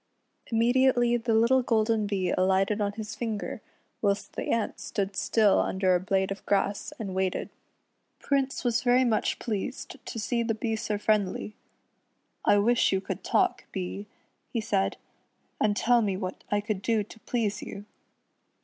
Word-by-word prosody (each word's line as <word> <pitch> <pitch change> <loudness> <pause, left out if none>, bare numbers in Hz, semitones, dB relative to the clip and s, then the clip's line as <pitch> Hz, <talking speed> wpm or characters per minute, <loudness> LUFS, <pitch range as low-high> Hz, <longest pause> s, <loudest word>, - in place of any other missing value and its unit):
Immediately 240 +1 +3
the 230 -1 0
little 235 +4 +4
golden 220 -3 +1
Bee 195 -3 0
alighted 190 +3 +2
on 205 0 0
his 215 0 -6
finger, 220 -4 -4 0.4
whilst 200 -1 0
the - - -4
ant 230 -2 -1
stood 195 -1 -3
still 210 -2 +3
under 190 -1 +2
a 180 - +3
blade 190 +1 0
of 195 - -5
grass, 200 +5 0
and 200 -5 -5
waited. 190 -1 -1 0.7
Prince 275 -1 -1
was 240 -2 +1
very 250 +1 +4
much 225 -4 +1
pleased 235 +3 -5
to - - -7
see 235 +2 0
the 225 -1 0
Bee 225 0 -1
so 215 -1 -2
friendly. 210 -1 0 0.9
"I 205 - +5
wish 235 +4 +3
you 190 - +2
could 190 - -5
talk, - - +1
Bee," 95 +3 -4 0.4
he 235 - -1
said, 205 -3 0 0.6
"and 210 -1 +2
tell 240 0 +4
me 200 -4 0
what 185 -2 -5
I 205 0 +1
could 205 -2 -3
do 220 0 +1
to 220 +2 -14
please 215 -3 -1
you." 200 - -8
215 Hz, 160 wpm, -28 LUFS, 195-235 Hz, 0.9 s, I